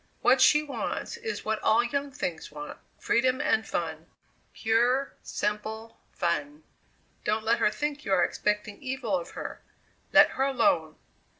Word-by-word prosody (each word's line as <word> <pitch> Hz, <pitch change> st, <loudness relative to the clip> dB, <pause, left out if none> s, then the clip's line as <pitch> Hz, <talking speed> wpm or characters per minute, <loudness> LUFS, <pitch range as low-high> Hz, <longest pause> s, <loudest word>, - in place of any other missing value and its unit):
What 260 Hz, +1 st, +5 dB
she 300 Hz, +3 st, +6 dB
wants 295 Hz, -, -4 dB
is 450 Hz, -2 st, -5 dB
what 215 Hz, 0 st, 0 dB
all 225 Hz, +2 st, +4 dB
young 280 Hz, +3 st, -2 dB
things 175 Hz, -, -4 dB
want 150 Hz, 0 st, -8 dB, 0.2 s
freedom 255 Hz, +2 st, +2 dB
and 290 Hz, -8 st, +1 dB
fun 160 Hz, -1 st, -3 dB, 0.4 s
pure, 240 Hz, +5 st, +1 dB
simple 220 Hz, +2 st, -4 dB
fun. 285 Hz, -, -2 dB, 0.6 s
Don't 215 Hz, +1 st, 0 dB
let 230 Hz, +1 st, +3 dB
her -, -, +4 dB
think 295 Hz, +7 st, -3 dB
you -, -, -4 dB
are 185 Hz, -2 st, +4 dB
expecting 210 Hz, 0 st, -1 dB
evil 255 Hz, -6 st, -2 dB
of 175 Hz, -2 st, -4 dB
her; -, -, -6 dB, 0.5 s
let -, -, +8 dB
her 265 Hz, -, 0 dB
alone!" 175 Hz, -, +2 dB
225 Hz, 145 wpm, -28 LUFS, 205-270 Hz, 0.6 s, let